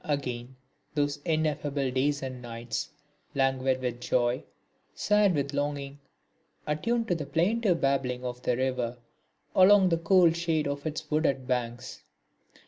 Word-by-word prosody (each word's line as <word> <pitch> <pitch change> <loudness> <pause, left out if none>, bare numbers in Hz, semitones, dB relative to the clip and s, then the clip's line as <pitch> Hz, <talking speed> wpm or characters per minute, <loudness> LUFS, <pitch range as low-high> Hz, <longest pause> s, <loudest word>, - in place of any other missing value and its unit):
Again 130 -3 -3 0.4
those 145 -1 0
ineffable 150 -4 0
days 140 +2 0
and 130 -2 -5
nights, 120 -1 -4 0.5
languid 135 -1 +1
with 120 -1 -3
joy, 120 0 +1 0.5
sad 210 -3 +3
with 140 0 -1
longing, 145 -1 -3 0.7
attuned 230 +10 0
to - - +3
the 155 -4 -4
plaintive 185 +3 +1
babbling 130 -2 0
of 125 0 -5
the 125 -1 0
river 125 -2 -1 0.6
along 190 0 +7
the 165 - +2
cool 175 0 +5
shade 165 -3 0
of 140 +2 -3
its 155 0 -5
wooded 140 -4 +1
banks. 120 -2 -3
140 Hz, 135 wpm, -28 LUFS, 130-160 Hz, 0.7 s, along